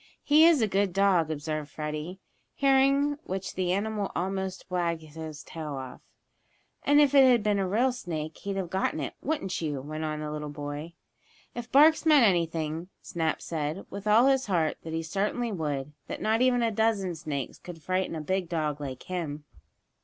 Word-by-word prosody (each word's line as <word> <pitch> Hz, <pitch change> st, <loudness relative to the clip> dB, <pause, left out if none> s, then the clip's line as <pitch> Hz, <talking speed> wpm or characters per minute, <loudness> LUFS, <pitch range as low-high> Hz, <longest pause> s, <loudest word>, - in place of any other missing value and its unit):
"He 305 Hz, +2 st, +6 dB
is 315 Hz, -8 st, +4 dB
a -, -, +3 dB
good 195 Hz, -2 st, +1 dB
dog," 190 Hz, -5 st, +3 dB
observed 155 Hz, -1 st, -3 dB
Freddie, 155 Hz, +4 st, -5 dB, 0.4 s
hearing 275 Hz, +1 st, +3 dB
which 190 Hz, 0 st, -4 dB
the 185 Hz, -1 st, -1 dB
animal 205 Hz, +1 st, -1 dB
almost 190 Hz, +1 st, -3 dB
wagged 170 Hz, -3 st, -1 dB
his 155 Hz, -1 st, -8 dB
tail 155 Hz, -3 st, -6 dB
off. 130 Hz, -2 st, -8 dB, 0.8 s
"And 290 Hz, +1 st, +5 dB
if 290 Hz, -2 st, +4 dB
it 275 Hz, -1 st, +8 dB
had 240 Hz, -4 st, +4 dB
been 210 Hz, -1 st, +2 dB
a 190 Hz, -, 0 dB
real 235 Hz, +7 st, +2 dB
snake 160 Hz, -10 st, -5 dB
he'd 200 Hz, -1 st, -4 dB
have 185 Hz, -3 st, -3 dB
gotten 190 Hz, -4 st, 0 dB
it; 140 Hz, -, -4 dB
wouldn't 275 Hz, -, -2 dB
you?" 150 Hz, -4 st, -2 dB
went 155 Hz, +3 st, -5 dB
on 155 Hz, -1 st, -3 dB
the 150 Hz, 0 st, -4 dB
little 150 Hz, 0 st, -4 dB
boy. 145 Hz, +3 st, -6 dB, 0.6 s
If 240 Hz, 0 st, -7 dB
barks 310 Hz, +3 st, +6 dB
meant 300 Hz, -6 st, +6 dB
anything, 165 Hz, -2 st, 0 dB
Snap 160 Hz, -2 st, -2 dB
said, 155 Hz, +2 st, -3 dB
with 200 Hz, +1 st, -6 dB
all 220 Hz, +4 st, +6 dB
his 265 Hz, -3 st, +3 dB
heart, 165 Hz, -5 st, +1 dB
that 160 Hz, -, -7 dB
he 165 Hz, 0 st, -2 dB
certainly 210 Hz, +7 st, -1 dB
would 150 Hz, -6 st, -3 dB
that -, -, -5 dB
not 220 Hz, +2 st, +1 dB
even 250 Hz, -1 st, +3 dB
a 230 Hz, -, +2 dB
dozen 210 Hz, -4 st, +1 dB
snakes 150 Hz, -5 st, -5 dB
could 165 Hz, -3 st, -10 dB
frighten 185 Hz, -1 st, -1 dB
a 155 Hz, -, -4 dB
big 185 Hz, +2 st, -1 dB
dog 150 Hz, -3 st, -2 dB
like 130 Hz, -3 st, -6 dB
him. 160 Hz, -5 st, -4 dB
180 Hz, 185 wpm, -28 LUFS, 155-220 Hz, 0.8 s, it